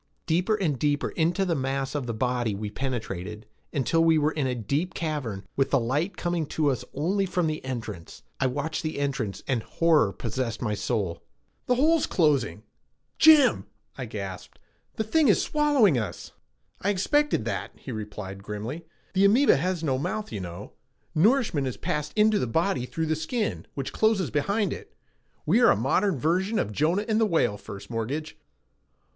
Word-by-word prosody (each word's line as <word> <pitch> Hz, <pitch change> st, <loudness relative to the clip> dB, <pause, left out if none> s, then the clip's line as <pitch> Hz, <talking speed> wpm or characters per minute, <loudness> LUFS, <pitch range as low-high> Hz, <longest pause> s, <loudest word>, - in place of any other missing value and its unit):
Deeper 180 Hz, +6 st, +2 dB
and 160 Hz, -, -1 dB
deeper 145 Hz, +1 st, +1 dB
into 175 Hz, +4 st, +1 dB
the 175 Hz, -, +1 dB
mass 135 Hz, -1 st, -2 dB
of 145 Hz, -4 st, -3 dB
the -, -, -1 dB
body 120 Hz, -2 st, 0 dB
we 105 Hz, +1 st, -5 dB
penetrated 105 Hz, -5 st, -4 dB, 0.3 s
until 145 Hz, +5 st, +2 dB
we 165 Hz, -1 st, +5 dB
were 150 Hz, 0 st, +2 dB
in 145 Hz, -4 st, -1 dB
a 125 Hz, -, -1 dB
deep 145 Hz, -, -2 dB
cavern 140 Hz, -, -3 dB
with 135 Hz, 0 st, +1 dB
the 140 Hz, -, +3 dB
light 145 Hz, +11 st, -1 dB
coming 175 Hz, -3 st, -1 dB
to 150 Hz, -1 st, +1 dB
us 130 Hz, -, -3 dB
only 185 Hz, +8 st, +1 dB
from 180 Hz, -1 st, 0 dB
the 155 Hz, -1 st, -2 dB
entrance. 115 Hz, -9 st, -6 dB, 0.2 s
I 135 Hz, -, +2 dB
watched 145 Hz, +5 st, -2 dB
the 155 Hz, -, -3 dB
entrance 135 Hz, -8 st, -2 dB
and 125 Hz, -4 st, +1 dB
horror 155 Hz, -7 st, +2 dB
possessed 115 Hz, +2 st, -3 dB
my 110 Hz, -4 st, -1 dB
soul. 100 Hz, -5 st, -2 dB, 0.5 s
"The 250 Hz, -, +3 dB
hole's 310 Hz, +5 st, +3 dB
closing. 145 Hz, -, +1 dB, 0.6 s
Jim!" 310 Hz, -4 st, +6 dB, 0.3 s
I -, -, -5 dB
gasped. -, -, -7 dB, 0.4 s
"The 220 Hz, -, -1 dB
thing 300 Hz, +7 st, +3 dB
is 205 Hz, -, +5 dB
swallowing 280 Hz, -, +3 dB
us!" 100 Hz, -7 st, -6 dB, 0.5 s
"I 200 Hz, -, 0 dB
expected 290 Hz, +10 st, +1 dB
that," -, -, -3 dB
he 135 Hz, -, -9 dB
replied 105 Hz, -3 st, -6 dB
grimly. 110 Hz, +11 st, -6 dB, 0.3 s
"The 195 Hz, +1 st, +4 dB
amoeba 240 Hz, -, +5 dB
has 175 Hz, +3 st, -1 dB
no 135 Hz, -4 st, +1 dB
mouth, 215 Hz, +9 st, -3 dB
you 105 Hz, -, -4 dB
know. 90 Hz, -2 st, -8 dB, 0.4 s
Nourishment 195 Hz, -, +3 dB
is 125 Hz, -, -4 dB
passed 150 Hz, 0 st, -2 dB
into 215 Hz, 0 st, +4 dB
the 125 Hz, -, -1 dB
body 160 Hz, -1 st, 0 dB
through 160 Hz, +4 st, -2 dB
the 160 Hz, 0 st, 0 dB
skin, 210 Hz, +8 st, -2 dB
which 135 Hz, -2 st, -4 dB
closes 220 Hz, -6 st, +2 dB
behind 200 Hz, +7 st, 0 dB
it. -, -, -11 dB, 0.5 s
We 205 Hz, +11 st, +4 dB
are -, -, +7 dB
a -, -, +5 dB
modern 145 Hz, -, +1 dB
version 185 Hz, -, +1 dB
of 105 Hz, -, 0 dB
Jonah 165 Hz, -, +1 dB
and 220 Hz, 0 st, +2 dB
the 220 Hz, -, +4 dB
whale, 165 Hz, -, +2 dB
First 100 Hz, +1 st, -10 dB
Mortgage." 130 Hz, +8 st, -3 dB
150 Hz, 175 wpm, -26 LUFS, 120-190 Hz, 0.6 s, are